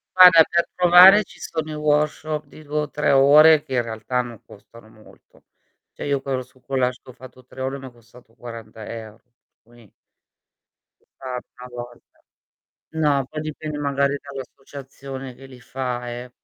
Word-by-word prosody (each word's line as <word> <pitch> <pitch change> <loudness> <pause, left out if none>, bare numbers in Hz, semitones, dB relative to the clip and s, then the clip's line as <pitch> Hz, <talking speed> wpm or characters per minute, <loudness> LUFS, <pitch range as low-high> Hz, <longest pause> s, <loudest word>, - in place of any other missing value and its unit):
Guarda 180 -3 +9
per 170 0 +1
provare 180 +3 +8
ci - - -18
sono 160 -1 -5
i - - -5
workshop 150 0 -1
di 155 +2 -15
2 150 +1 -3
o 150 - -5
3 150 - 0
ore, 145 +3 +6
che 130 - -8
in 120 - +2
realtà 115 +2 -3
non 120 -3 -10
costano 110 +2 -17
molto. 110 -1 -21 0.5
Cioè - - -8
io 140 -2 -1
quello 135 -2 -3
sul 130 +1 -25
collage 130 -2 -1
che - - -16
ho 130 - -11
fatto 130 -1 -15
3 130 - -11
ore 135 +1 -3
m'è 135 -2 -10
costato 120 0 -21
40€, 110 -1 -10 0.4
quindi 120 -3 -21 1.3
Un 130 - -8 0.3
tanto 125 -1 -10
a - - -3
volta 120 0 -18 0.7
No, 145 -4 +1
poi 155 +3 -7
dipende 155 0 -6
magari 140 -1 0
dall'associazione 135 -1 -10
che 135 - -14
li 130 -2 -15
fa 125 -1 -5
eh, 120 +1 -8
135 Hz, 165 wpm, -22 LUFS, 120-150 Hz, 1.3 s, Guarda